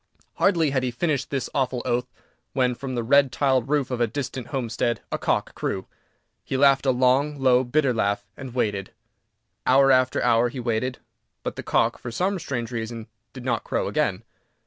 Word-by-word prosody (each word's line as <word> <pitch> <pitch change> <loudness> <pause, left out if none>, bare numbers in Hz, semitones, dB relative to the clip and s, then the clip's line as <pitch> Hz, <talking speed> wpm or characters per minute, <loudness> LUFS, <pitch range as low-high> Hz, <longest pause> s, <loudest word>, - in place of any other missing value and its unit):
Hardly 165 -7 +3
had 135 -1 +1
he 125 - -1
finished 140 +2 -1
this 135 -4 -2
awful 130 -3 0
oath 125 0 0 0.5
when, 125 -2 +2
from 130 +1 -5
the 120 - -1
red 140 +2 +4
tiled 130 -2 +1
roof 145 -3 +1
of 125 -1 -2
a 120 - +3
distant 130 0 -5
homestead, 120 -3 -1
a - - -1
cock - - 0
crew. 95 - -3 0.6
He 135 - -2
laughed 135 0 +4
a - - +6
long, 130 +4 +2
low, 130 -1 +4
bitter 130 +1 +1
laugh, 100 -3 0
and 130 -2 -9
waited. 100 -5 -1 0.7
Hour 135 +1 +6
after 130 0 +3
hour 120 0 +3
he 130 - -7
waited, 120 +1 -1 0.5
but - - -3
the - - -5
cock, - - +1
for 120 - -6
some 185 - -1
strange 120 -6 -4
reason, 115 -1 -5 0.2
did 125 +1 -10
not 120 -3 0
crow - - -1
again. - - 0
130 Hz, 185 wpm, -24 LUFS, 120-135 Hz, 0.7 s, a